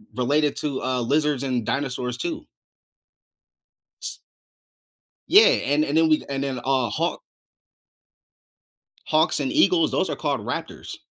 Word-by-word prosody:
related 145 +4 +1
to, 140 -3 -3
uh, 130 -1 -1
lizards 145 +2 0
and 125 -5 -2
dinosaurs, 125 -3 -3
too. 335 -2 -4 1.6
S - - -6 1.1
Yeah, 425 +4 +8
and 155 - +2
and 145 - -2
then 160 0 +4
we 155 -1 +2
and 135 0 -3
then, 135 -2 -3
uh, 130 -1 0
hawk - - -2 1.9
hawks 155 +2 +2
and 270 - -2
eagles, 325 +2 +3
those - - 0
are - - -3
called - - -2
raptors. - - -6
145 Hz, 130 wpm, -23 LUFS, 130-160 Hz, 1.9 s, Yeah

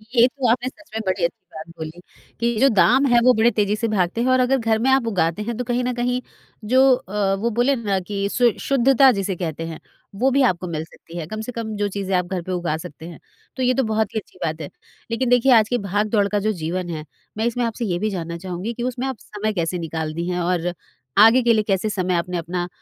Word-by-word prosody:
ये 240 0 +7
तो 260 -1 -2
आपने 245 +1 0
सच 310 +2 -21
में 220 - -1
बड़ी 185 -1 -1
अच्छी 170 - -2
बात 155 +1 -8
बोली 160 +2 -7 0.4
कि 235 0 +1
जो 275 - +6
दाम 255 +5 +4
हैं 240 -2 +5
वो 255 - +6
बड़े 225 +1 +3
तेज़ी 210 -1 +1
से 230 +2 -1
भागते 195 +1 0
हैं 250 - +1
और 255 - +4
अगर 255 +2 +3
घर 225 -3 +1
में 250 +4 +1
आप 265 -3 +3
उगाते 180 -3 0
हैं 230 +2 -3
तो 250 - -2
कहीं 245 +1 -1
न 250 0 -1
कहीं 245 +1 -1 0.5
जो 260 - +6
अ, 200 -3 -1
वो 225 +4 -1
बोले 245 +5 +2
ना 205 -6 -1
कि 200 -1 -1
शु 240 +2 +3
शुद्धता 270 0 +4
जिसे 195 -3 -2
कहते 165 -3 -4
हैं, 165 -1 -7 0.4
वो 255 +6 +2
भी 275 +2 +3
आपको 180 0 -3
मिल 160 -2 -3
सकती 165 +1 -13
है 165 - -4
कम 215 +4 -5
से 220 - -6
कम 225 -2 -5
जो 205 0 0
चीज़ें 195 -1 -2
आप 180 - 0
घर 180 0 -3
पर 185 - -6
उगा 175 -4 -1
सकते 160 -1 -10
हैं, 170 -3 -10 0.4
तो 260 - -2
ये 255 0 +3
तो 265 - +1
बहुत 220 -1 -1
ही - - +2
अच्छी 205 - -18
बात 160 0 -2
है। 145 - -6 0.4
लेकिन 245 +2 0
देखिए 245 +2 +4
आज 220 -2 +5
के 245 - +1
भाग-दौड़ 205 0 0
का 205 0 0
जो 215 +2 0
जीवन 175 0 -3
है, 155 -2 -5 0.3
मैं 220 - 0
इसमें 240 +1 0
आपसे 230 +1 -3
ये 175 -4 -1
भी 215 - 0
जानना 170 -3 -4
चाहूँगी 185 +5 -5
कि 240 - -5
उसमें 255 +1 -2
आप 265 -3 -4
समय 215 +1 -4
कैसे 175 -1 -1
निकालती 160 0 -4
हैं? 180 0 -1
और 175 0 0 0.4
आगे 225 +5 +7
के 235 0 +4
लिए 215 -1 +2
कैसे 195 +1 +1
समय 185 -3 -1
आपने 175 +1 -1
अपना 175 +1 -3
210 Hz, 255 wpm, -22 LUFS, 180-240 Hz, 0.5 s, ये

